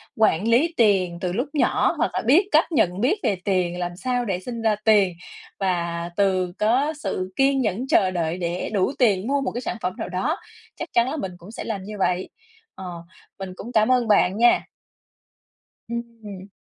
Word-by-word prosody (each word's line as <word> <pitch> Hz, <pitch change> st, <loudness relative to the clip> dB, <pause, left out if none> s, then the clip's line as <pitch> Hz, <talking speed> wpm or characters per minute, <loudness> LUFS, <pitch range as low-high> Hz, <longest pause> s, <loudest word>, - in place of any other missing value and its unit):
quản 215 Hz, -2 st, +2 dB
lý 290 Hz, +9 st, +3 dB
tiền 190 Hz, -6 st, +3 dB
từ 180 Hz, -1 st, -2 dB
lúc 250 Hz, +7 st, -1 dB
nhỏ 295 Hz, -, +2 dB
hoặc -, -, +1 dB
là -, -, -1 dB
biết 340 Hz, -, +5 dB
cách 315 Hz, +3 st, +3 dB
nhận 185 Hz, -, +1 dB
biết 365 Hz, -, +2 dB
về 200 Hz, -, +2 dB
tiền, 180 Hz, -2 st, 0 dB
làm 175 Hz, 0 st, -3 dB
sao 245 Hz, +3 st, -1 dB
để 185 Hz, -3 st, -2 dB
sinh 230 Hz, +3 st, -6 dB
ra 220 Hz, -2 st, +2 dB
tiền 205 Hz, -5 st, +4 dB, 0.5 s
và 170 Hz, -2 st, -1 dB
từ 185 Hz, -3 st, +1 dB
có 260 Hz, +8 st, +2 dB
sự 185 Hz, +1 st, -3 dB
kiên 270 Hz, 0 st, +3 dB
nhẫn 230 Hz, +4 st, -1 dB
chờ 185 Hz, -6 st, +3 dB
đợi 170 Hz, -1 st, -2 dB
để 175 Hz, 0 st, -3 dB
đủ 200 Hz, +6 st, +1 dB
tiền 210 Hz, -3 st, +3 dB
mua 280 Hz, 0 st, +1 dB
một 270 Hz, -, -2 dB
cái 245 Hz, -, -4 dB
sản 235 Hz, -, -4 dB
phẩm 180 Hz, 0 st, -2 dB
nào -, -, -5 dB
đó, 275 Hz, -, -1 dB, 0.4 s
chắc -, -, -5 dB
chắn 235 Hz, +2 st, +3 dB
là 310 Hz, -, -3 dB
mình 190 Hz, -8 st, -4 dB
cũng 180 Hz, +5 st, -13 dB
sẽ -, -, -6 dB
làm 200 Hz, -4 st, -4 dB
như 210 Hz, +2 st, -8 dB
vậy. 180 Hz, 0 st, 0 dB, 0.5 s
Ờ, 175 Hz, -3 st, -8 dB, 0.4 s
mình 190 Hz, -1 st, -6 dB
cũng 235 Hz, +6 st, -8 dB
cảm 220 Hz, +2 st, +3 dB
ơn 245 Hz, -2 st, +2 dB
bạn 200 Hz, -1 st, +3 dB
nha. 240 Hz, +1 st, +5 dB, 1.3 s
Ừm. 225 Hz, -5 st, -7 dB
205 Hz, 200 wpm, -23 LUFS, 185-245 Hz, 1.3 s, biết